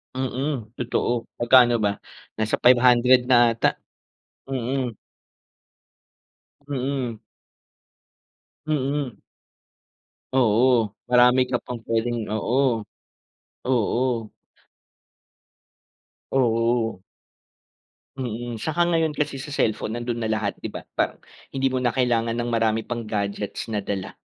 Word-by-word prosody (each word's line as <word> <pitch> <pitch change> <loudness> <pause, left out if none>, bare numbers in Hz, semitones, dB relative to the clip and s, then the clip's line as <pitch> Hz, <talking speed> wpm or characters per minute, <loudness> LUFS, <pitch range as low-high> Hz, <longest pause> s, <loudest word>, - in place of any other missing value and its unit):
Mm, 130 -2 -3
totoo. 120 -1 -1 0.2
Magkano 120 0 +6
ba? 100 -2 +1 0.4
Nasa 110 0 0
500 125 0 +6
na 120 -2 +5
ata. 115 - +1 0.7
Mm. 130 -2 -2 1.7
Mm. 130 -4 -3 1.5
Mm. 140 -3 -1 1.1
Oo. 120 -3 +3 0.2
Marami 125 +1 +6
ka 125 - +1
pang 125 -1 -5
pwedeng 115 +1 0
oo. 110 +4 0 1.1
Oo. 120 -2 0 2.0
Oo. 115 -4 +1 1.2
Mm, 120 -1 -4
saka 160 +7 0
ngayon 160 -2 +1
kasi 145 -2 -2
sa 140 +2 -6
cellphone 110 0 0
nando'n 120 0 -3
na 110 - -1
lahat 110 -2 -2
'di - - -5
ba? - - -8 0.2
Pa - - +1 0.4
hindi 135 0 +1
mo 130 - 0
na 125 -2 0
kailangan 115 -3 +1
ng 120 0 -2
marami 115 -1 +1
pang 120 -1 -5
gadgets 100 +1 -3
na 105 - 0
dala. 100 -1 -4
120 Hz, 100 wpm, -24 LUFS, 115-130 Hz, 2.0 s, Magkano